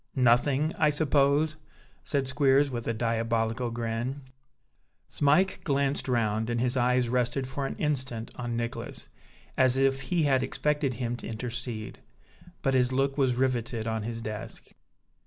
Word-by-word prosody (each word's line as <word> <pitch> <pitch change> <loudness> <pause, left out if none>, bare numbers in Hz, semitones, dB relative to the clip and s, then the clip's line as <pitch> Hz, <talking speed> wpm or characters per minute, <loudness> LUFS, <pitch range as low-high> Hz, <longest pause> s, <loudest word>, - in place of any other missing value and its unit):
"Nothing, 130 +4 +3
I 155 -2 +5
suppose?" 145 +1 +2 0.5
said 140 -2 -1
Squeers, 135 +1 +3
with 120 -2 -4
a - - +2
diabolical 115 +1 0
grin. 120 +4 -3 0.9
Smike 155 +7 +2
glanced 140 -2 0
round, 110 -2 0
and 120 0 0
his 125 +1 +1
eyes 125 0 +2
rested 125 +2 0
for 135 +1 -3
an - - -5
instant 130 -6 -2
on 120 -1 -3
Nicholas, 115 0 -5 0.5
as 130 0 +3
if 135 0 +2
he 160 +5 0
had 135 -3 +3
expected 145 -1 0
him 120 -1 -2
to - - -8
intercede; 115 -1 -5 0.6
but 135 -2 +2
his 125 -1 +3
look 135 +1 +1
was 130 -4 +2
riveted 120 -3 -1
on 110 -1 -1
his 115 +1 -4
desk. 110 -1 -7
125 Hz, 145 wpm, -28 LUFS, 115-140 Hz, 0.9 s, I